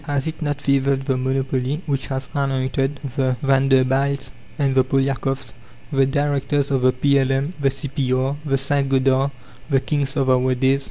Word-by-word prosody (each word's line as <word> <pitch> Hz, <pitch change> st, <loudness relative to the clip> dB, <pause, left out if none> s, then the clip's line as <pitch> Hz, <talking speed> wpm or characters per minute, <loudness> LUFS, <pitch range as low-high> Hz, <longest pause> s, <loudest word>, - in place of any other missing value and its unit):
Has 145 Hz, -2 st, -1 dB
it 160 Hz, +1 st, -4 dB
not 145 Hz, -2 st, -2 dB
favoured 140 Hz, -1 st, +1 dB
the 135 Hz, -1 st, 0 dB
monopoly 130 Hz, +3 st, -1 dB
which 140 Hz, -4 st, -2 dB
has 130 Hz, -1 st, -4 dB
anointed 135 Hz, 0 st, -1 dB, 0.2 s
the 130 Hz, -3 st, +1 dB
Vanderbilts 135 Hz, 0 st, +2 dB, 0.3 s
and 140 Hz, -3 st, +1 dB
the 130 Hz, 0 st, +4 dB
Polyakoffs, 135 Hz, 0 st, -1 dB, 0.4 s
the 135 Hz, -2 st, +3 dB
directors 140 Hz, 0 st, 0 dB
of 135 Hz, -2 st, +1 dB
the 130 Hz, 0 st, +4 dB
P.L.M., 135 Hz, +2 st, +1 dB
the 140 Hz, -1 st, +2 dB
C.P.R., 135 Hz, -1 st, -1 dB
the 135 Hz, -3 st, +1 dB
St. 140 Hz, 0 st, 0 dB
Gothard, 135 Hz, 0 st, +2 dB, 0.4 s
"the 135 Hz, -2 st, +3 dB
kings 140 Hz, 0 st, -2 dB
of 135 Hz, -2 st, +1 dB
our 130 Hz, 0 st, +2 dB
days"? 135 Hz, +2 st, +2 dB
135 Hz, 160 wpm, -21 LUFS, 130-140 Hz, 0.4 s, the